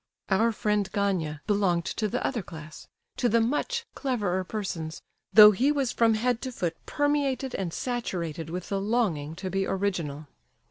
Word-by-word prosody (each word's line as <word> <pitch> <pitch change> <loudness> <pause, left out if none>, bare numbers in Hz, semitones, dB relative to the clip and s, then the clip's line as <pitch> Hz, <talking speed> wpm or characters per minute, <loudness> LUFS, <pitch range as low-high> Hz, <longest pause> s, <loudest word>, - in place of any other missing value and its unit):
Our 220 +4 +3
friend, 210 -2 0
Gania, 180 -8 -1
belonged 190 -5 +1
to 215 +3 -1
the 245 +4 -2
other 245 -5 -1
class—to 160 +8 -6
the 230 - +4
"much 295 - 0
cleverer" 205 -9 -1
persons, 180 -6 -5 0.3
though 210 +1 +10
he 255 +8 +2
was 275 -4 0
from 225 -1 +3
head 245 +2 0
to 260 - -4
foot 175 -8 -2
permeated 285 -3 0
and 185 -3 -2
saturated 170 - -3
with 180 +2 -5
the 195 -1 -1
longing 195 -9 0
to 185 +1 -5
be 195 0 0
original. 170 -7 -2
200 Hz, 155 wpm, -27 LUFS, 175-240 Hz, 0.3 s, though